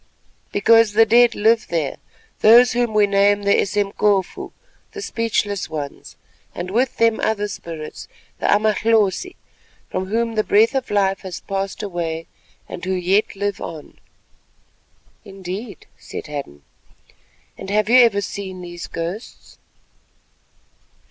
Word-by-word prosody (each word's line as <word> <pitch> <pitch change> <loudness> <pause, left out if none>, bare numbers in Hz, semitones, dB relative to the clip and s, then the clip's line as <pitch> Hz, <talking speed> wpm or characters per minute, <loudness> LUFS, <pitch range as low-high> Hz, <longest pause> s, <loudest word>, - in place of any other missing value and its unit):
"Because 225 +1 +4
the 225 +2 +6
dead 235 +1 +4
live 225 +2 +2
there, 160 -5 -2 0.4
those 235 +3 +7
whom 240 -1 0
we 210 -1 +5
name 200 0 +2
the 200 0 +3
Esemkofu, 200 -1 0 0.4
the 415 - -7
Speechless 210 - -2
Ones, 150 -3 -7 0.4
and 185 - -5
with 245 +4 0
them 230 -1 +3
other 210 -1 0
Spirits, 165 -6 -8 0.3
the - - -1
Amahlosi, 220 - +2 0.6
from 185 0 -3
whom 230 +3 -1
the 215 -1 +1
breath 220 +5 +3
of 265 -2 -2
life 195 -1 +1
has 185 -3 -8
passed 195 +1 -4
away, 165 -4 -4 0.4
and - - -8
who 190 0 -1
yet 185 +4 +1
live 200 -1 -3
on." 155 -3 -9 1.2
"Indeed," 195 +2 -8
said - - -8
Hadden, 140 - -7 0.9
"and - - -9
have 210 +1 +1
you 250 +3 +6
ever 225 -5 +4
seen 190 -2 -6
these 175 -1 -8
ghosts?" 175 +7 -7
205 Hz, 130 wpm, -20 LUFS, 185-225 Hz, 1.2 s, those